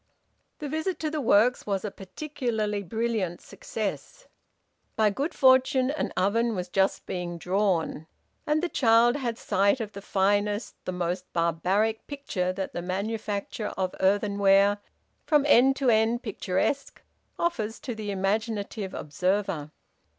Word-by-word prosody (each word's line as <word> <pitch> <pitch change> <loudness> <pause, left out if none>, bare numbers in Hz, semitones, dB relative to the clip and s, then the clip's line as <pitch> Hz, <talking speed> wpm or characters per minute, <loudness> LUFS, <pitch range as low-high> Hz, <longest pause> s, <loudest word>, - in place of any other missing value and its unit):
The 300 - -5
visit 315 +4 -2
to 310 -1 -1
the 305 -1 -2
works 230 +1 +3
was 200 0 -1
a 205 - -3
particularly 215 -1 -3
brilliant 210 -2 -2
success. - - -6 0.7
By 215 -1 +3
good 280 - -2
fortune 260 0 +4
an 300 - -2
oven 225 +4 +2
was 180 -1 -4
just 190 +1 +1
being 175 -2 -4
`drawn,' 180 -4 0 0.4
and 305 +2 +1
the - - +2
child 235 -5 +4
had 240 -5 -3
sight 200 +4 +2
of 215 -2 -4
the 200 - -9
finest, 205 +2 0
the - - -2
most 180 0 -3
barbaric 185 +6 0
picture 220 -11 -2
that 190 0 -4
the 175 - -3
manufacture 205 +3 -3
of 185 -1 -1
earthenware, 200 0 +3 0.5
from 295 -3 +4
end 270 0 +6
to 265 -3 +2
end 225 +2 +2
picturesque, 215 +6 -2 0.3
offers 225 -11 -1
to 250 - -4
the 215 -2 -6
imaginative 200 0 -2
observer. 165 0 -1
210 Hz, 135 wpm, -27 LUFS, 190-245 Hz, 0.7 s, end